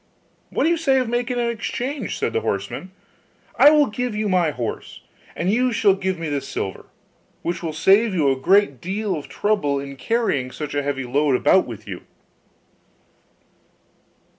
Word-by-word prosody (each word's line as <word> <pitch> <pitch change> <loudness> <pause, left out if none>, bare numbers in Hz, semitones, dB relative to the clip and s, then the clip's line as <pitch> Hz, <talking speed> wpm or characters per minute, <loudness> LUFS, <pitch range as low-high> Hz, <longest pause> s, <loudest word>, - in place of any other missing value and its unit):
'What - - -1
do 320 - +3
you 340 - +2
say 275 -5 +2
of 255 -2 +1
making 245 +1 -1
an 235 -1 +1
exchange?' 245 +5 -4
said - - -2
the 450 - 0
horseman. 185 - -3 0.7
'I 290 - +9
will 300 -1 +5
give 245 -1 -3
you 215 0 -1
my 180 -4 +2
horse, 125 -6 -5 0.3
and 180 +3 0
you 250 +2 +2
shall 205 -4 +4
give 190 -1 -2
me 165 -1 -4
the 145 -2 -1
silver; 130 -8 -5 0.6
which 170 - -2
will 165 -2 -3
save 195 +7 +3
you 145 -5 +3
a - - +1
great 165 - +2
deal 195 +2 -2
of 150 - -7
trouble 200 -10 0
in 140 0 -7
carrying 215 - 0
such 150 +3 -6
a 145 - 0
heavy 140 -1 -2
load 140 +2 +1
about - - +3
with - - -9
you. - - -6
190 Hz, 175 wpm, -22 LUFS, 145-235 Hz, 0.7 s, I